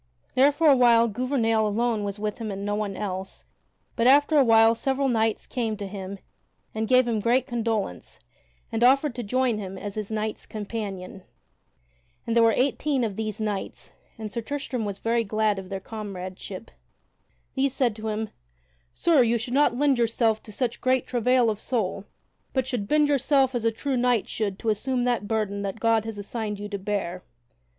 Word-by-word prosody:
There 275 +3 +5
for 290 +3 -1
a 290 -3 +8
while 235 -2 +5
Gouvernail 225 -1 +1
alone 220 0 0
was 200 0 -3
with 210 +1 -3
him 225 -2 -4
and 200 0 -5
no 205 - -1
one 205 -2 -2
else, 190 -2 -5 0.5
but 230 - +2
after 290 +3 +5
a - - +6
while 225 -1 +6
several 270 +4 0
knights 225 -3 +1
came 225 -4 -2
to 200 - -5
him 195 0 -6 0.6
and 220 0 -2
gave 255 0 +4
him 225 -2 0
great 240 +5 +2
condolence 225 - -3 0.5
and 225 +1 0
offered 275 +2 +4
to 245 - -5
join 245 +1 0
with 210 - -4
him 190 0 -7
as 205 +1 -6
his 210 -1 -4
knights 215 0 -3
companion. 200 -3 -6 1.0
And 230 - -1
there 235 - +6
were 230 0 +6
eighteen 275 +1 +1
of 210 -4 -2
these 215 -1 -4
knights, 210 -2 -4 0.3
and 215 -2 -6
Sir 235 - -3
Tristram 265 -2 -3
was 200 -1 -4
very 230 +2 0
glad 215 -1 0
of 185 -1 -9
their 195 -1 -4
comradeship. 190 -1 -7 0.8
These 270 0 0
said 240 -5 +1
to 220 0 -5
him: 215 0 -3 0.6
"Sir, 325 -5 +4
you 235 0 +3
should 240 +2 -4
not 275 -3 +3
lend 280 -2 +2
yourself 225 -1 +1
to 215 - -12
such 240 +2 -2
great 255 0 +2
travail 250 0 +2
of 215 -2 -1
soul, 205 -5 -2 0.5
but 260 -2 +1
should 245 -6 -3
bend 300 +2 +3
yourself 275 -1 +3
as 235 -2 -2
a 230 - +3
true 265 +4 -2
knight 245 -2 +2
should 200 -3 -2
to 225 - -2
assume 245 +4 0
that 240 -4 0
burden 210 -2 -1
that 200 +2 -4
God 225 -1 +2
hath 225 -2 -5
assigned 210 0 -4
you 205 - -5
to 200 -1 -4
bear." 190 -3 -3
225 Hz, 190 wpm, -25 LUFS, 205-250 Hz, 1.0 s, a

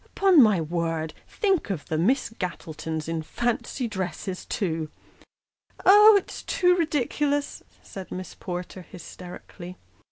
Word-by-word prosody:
Upon 380 -6 +6
my 210 -6 +5
word! 165 -1 -2
think 390 - 0
of 170 -8 -3
the 155 - -2
Miss 235 +9 +1
Gattletons 160 -3 -4
in 165 -1 -2
fancy 240 - -2
dresses, 190 -2 -5
too! 160 -6 -2 0.3
" - - -31
" - - -21
Oh, 420 +2 +9
it's 395 - -5
too 360 -1 +2
ridiculous! 290 -3 -1
" - - -30
said 190 -2 -9
Miss 185 0 -6
Porter, 180 0 -6
hysterically. 180 0 -11
190 Hz, 135 wpm, -25 LUFS, -, 0.3 s, Oh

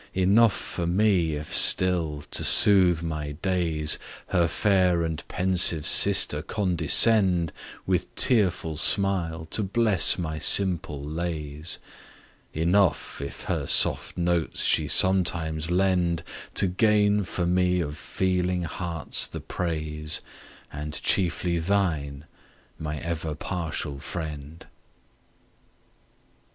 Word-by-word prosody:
Enough 100 +3 +3
for 85 -2 -5
me, 90 -3 +1
if 75 0 -6
still, 85 -5 +2
to - - -1
sooth 90 -5 +5
my 75 -3 -4
days, 80 -3 -1 0.3
Her 85 -3 +2
fair 90 -2 +1
and 80 -1 -4
pensive 90 -4 +1
sister 75 - +3
condescend, 90 -1 +3 0.3
With 90 -1 -2
tearful 95 - +2
smile 85 -3 0
to - - 0
bless 105 -1 +3
my 80 -3 -4
simple 85 -8 +1
lays; 75 0 -4 0.7
Enough, 85 0 0
if 70 - -8
her - - -3
soft - - +1
notes 85 -2 -1
she 75 - +1
sometimes 85 -2 +1
lend, 90 -2 0 0.3
To - - +4
gain 105 +2 +2
for 90 0 -4
me 90 0 +1
of 75 -3 -4
feeling 90 +1 -2
hearts 85 -1 -2
the - - -8
praise, 75 -3 -4 0.5
And 75 +1 -5
chiefly 85 -1 0
thine, 80 -6 -2 0.5
my 75 -1 -5
ever 80 -1 -4
partial 80 -4 -4
friend! 75 0 -7
85 Hz, 105 wpm, -25 LUFS, 80-95 Hz, 0.7 s, sooth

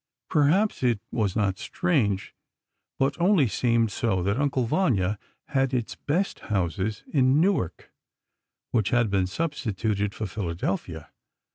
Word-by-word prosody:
Perhaps 165 +8 +3
it 120 -4 +2
was 105 -5 0
not 100 -3 0
strange—but 135 - -2
only 175 -7 +4
seemed 115 +1 +1
so—that 100 -4 0
"Uncle 135 -3 +1
Vanya" 105 - +1 0.3
had 135 -1 +1
its 120 -3 -2
best 180 +7 -1
houses 95 +1 -2
in 135 0 +4
Newark, 165 - 0 0.8
which 110 -5 +1
had 120 -4 +2
been 95 -2 +2
substituted 105 - -2
for 110 - -3
Philadelphia. 90 -4 -4
115 Hz, 115 wpm, -26 LUFS, 100-140 Hz, 0.8 s, only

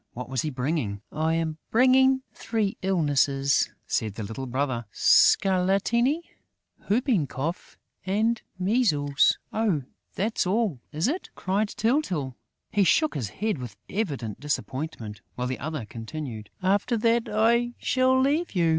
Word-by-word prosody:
What 125 +1 -7
was 130 -2 0
he 155 - -2
bringing? 125 -7 -2
"I 160 +1 0
am 160 -1 -2
bringing 260 +2 +4
three 215 -4 -1
illnesses," 145 -6 +2 0.2
said 110 -3 -1
the 110 - -5
little 115 +6 -5
brother. 130 -2 -1
"Scarlatina, 200 - +3 0.7
whooping 215 - +2
cough 150 +8 -5 0.3
and 220 +4 +1 0.2
measles...." 180 - +2 0.2
"Oh, 205 -10 +1 0.3
that's 210 -1 0
all, 200 - 0
is 155 +7 0
it?" 335 +8 -2
cried 200 +3 0
Tyltyl. 200 - -1 0.4
He 205 - +3
shook 310 - +3
his 120 -8 -3
head, 215 -6 -2
with 120 -5 -8
evident 140 - -3
disappointment, 130 -6 -4
while 125 - -2
the 130 0 -3
other 150 -4 -4
continued: 115 -1 -7
"After 205 +5 +2
that, 230 +1 +2
I 235 +3 +2
shall 260 0 +2
leave 290 +2 +1
you!" 170 -2 +3
175 Hz, 135 wpm, -26 LUFS, 135-225 Hz, 0.7 s, bringing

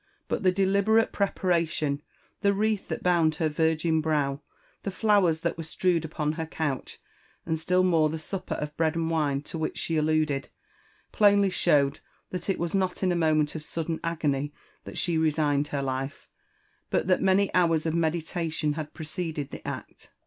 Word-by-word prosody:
But - - -1
the 185 - +4
deliberate 200 +4 +3
preparation—the 170 -1 -1
wreath 215 0 0
that - - -4
bound 170 -3 +3
her 160 -1 0
virgin 160 +1 +1
brow 145 -3 0 0.2
* - - -35
the - - -3
flowers 195 -5 +2
that 170 0 -1
were 165 - -4
strewed 170 +2 +1
jupon 155 0 -2
her 160 -1 -3
couch 150 -5 -3 0.2
— - - -35
and 160 -1 -1
still 180 +3 +2
more, 165 -4 +3
the 160 - -3
supper 185 +4 -4
of 150 0 -5
bread 160 0 +1
and 165 0 -1
wine 145 -3 0
to 165 - -6
which 160 - -2
she 165 - -1
alluded, 155 -2 +1 0.6
plainly 200 -2 +4
showed 145 -5 +2 0.3
that 180 +1 -4
it 195 - +1
was 170 -1 -2
not 190 -1 0
in 185 - +3
a - - +1
moment 155 -3 +2
of 160 - -6
sudden 165 +1 -3
agony 145 -4 -1 0.3
that - - -8
she 170 -3 +1
resigned 150 -2 +2
her 140 -2 -2
life, 135 +1 -4 0.6
but - - +1
that 185 0 +2
many 195 +1 +3
hours 165 -3 +3
of 160 - 0
meditation 160 -1 -1
had 155 0 -6
preceded 160 -3 -4
the - - -8
act. - - -7
160 Hz, 180 wpm, -27 LUFS, 155-180 Hz, 0.6 s, the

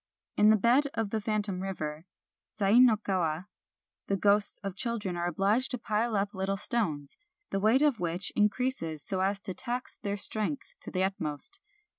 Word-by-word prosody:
In 210 - +5
the 220 - +7
bed 240 +7 +3
of 220 -3 -2
the 220 - -1
phantom 205 -3 -1
river, 160 -4 -5 0.5
Sai 205 +3 +4
no 245 -4 +6
Kawa, 180 -5 -2 0.6
the 195 - 0
ghosts 205 +1 +2
of 195 -2 -4
children 210 -5 -2
are 175 0 -2
obliged 200 +9 +1
to 250 - -2
pile 225 0 -1
up 200 0 -1
little 195 0 -2
stones, 165 -11 +1 0.3
the 195 - 0
weight 225 +8 +3
of 285 -7 +2
which 175 +2 -2
increases 210 - 0
so 190 -1 -1
as 195 +1 +1
to 190 - -5
tax 245 +4 -3
their 200 0 -3
strength 220 - -1
to - - -9
the 185 0 -1
utmost. 190 - -1
200 Hz, 175 wpm, -29 LUFS, 185-225 Hz, 0.6 s, the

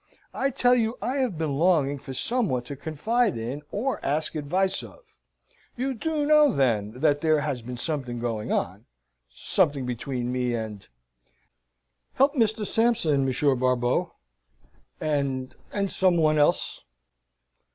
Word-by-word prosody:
I 275 - 0
tell 250 -2 +3
you 230 -1 +1
I 260 +3 -2
have 250 - -1
been 155 -3 -1
longing 150 -5 +2
for 135 - -9
some 235 - +1
one 125 -1 -1
to 140 +3 -7
confide 205 - 0
in, 120 +6 -4
or 255 +6 -2
ask 150 +3 -1
advice 180 +6 0
of. - - -12 0.8
You 265 +2 -1
do 305 +3 -1
know, 300 -1 +5
then, 110 - +1
that 145 -2 +3
there 155 -2 +3
has 145 -4 -2
been 125 +2 -7
something 125 -4 -2
going 115 -3 -3
on - - -2 0.4
something 140 - +1
between 125 0 -3
me 125 -1 -1
and 110 -3 -6 1.3
help 275 +2 +4
Mr. 220 -5 +1
Sampson, 205 - +2
Monsieur 135 +2 +2
Barbeau 125 -1 0 0.8
and 140 -4 -1 0.2
and 200 -1 -1
some 185 -2 +2
one 155 -2 +3
else?" 145 - +1
150 Hz, 140 wpm, -26 LUFS, -, 1.3 s, know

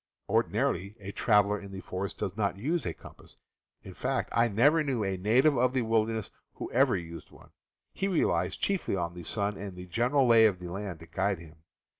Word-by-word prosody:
Ordinarily 100 +4 0
a 100 0 -7
traveler 105 -1 +3
in 100 -1 -10
the.. 95 - -7
forest 95 +1 -5
does 95 - -3
not 100 -3 -1
use 145 - -1
a 85 - -2
compass - - -15 0.2
— - - -52
in 95 - -10
fact 130 +7 -2
^. - - -4
J 115 - +4
I - - +2
never 145 +9 +4
knew 130 -6 -1
a 95 -1 -1
native 120 +10 +3
of 125 +1 +2
the 130 -2 +1
wilderness 110 -1 0 0.2
who - - -6
ever - - +3
used 85 -2 -8
one - - -18 0.2
— - - -60
he 195 - -1
relies 185 -5 +1
chiefly 195 - -1
on 85 -2 -2
the 90 - -8
sun 100 +1 -1
and 100 -2 -6
the 90 0 -8
general 125 +9 +2
lay 115 -2 +7
of 100 -4 -1
the 90 -1 -8
land 95 -4 -5
to - - -10
guide 100 +3 -1
him. 80 -1 -14
105 Hz, 225 wpm, -29 LUFS, 95-120 Hz, 0.2 s, lay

